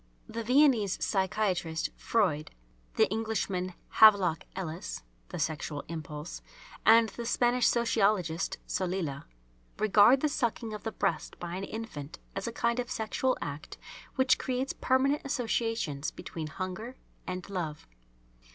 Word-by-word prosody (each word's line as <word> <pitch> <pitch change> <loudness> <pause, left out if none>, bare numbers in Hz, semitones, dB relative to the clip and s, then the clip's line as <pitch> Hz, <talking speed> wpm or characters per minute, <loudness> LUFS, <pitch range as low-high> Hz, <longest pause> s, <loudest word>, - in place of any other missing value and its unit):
The 230 0 -4
Viennese 250 -5 +4
psychiatrist 190 -4 0
Freud, 180 -10 +1 0.5
the - - +5
Englishman 205 -5 -1 0.2
Havelock 195 -7 +6
Ellis 175 - -5 0.3
("The - - -5
Sexual 150 -1 -2
Impulse"), 155 -1 -6 0.5
and 225 0 +7
the 235 +4 -7
Spanish 245 0 +3
Sociologist 200 -7 +1
Solila, 180 -7 -2 0.5
regard 215 +5 +6
the 305 - +3
sucking 235 -5 -1
of 210 - -6
the 225 - -3
breast 195 -7 -2
by 175 0 -5
an 195 +1 -3
infant 195 -12 -7 0.2
as 195 +2 -3
a - - -2
kind 235 +1 0
of 245 0 -2
sexual 255 +2 0
act 145 +1 -7 0.4
which 260 -1 +4
creates 260 +1 -1
permanent 270 +3 +2
associations 225 - -1
between 160 -2 -6
hunger 185 +9 -5 0.3
and 185 -1 -4
love. 170 -6 -4
205 Hz, 125 wpm, -30 LUFS, 170-235 Hz, 0.5 s, and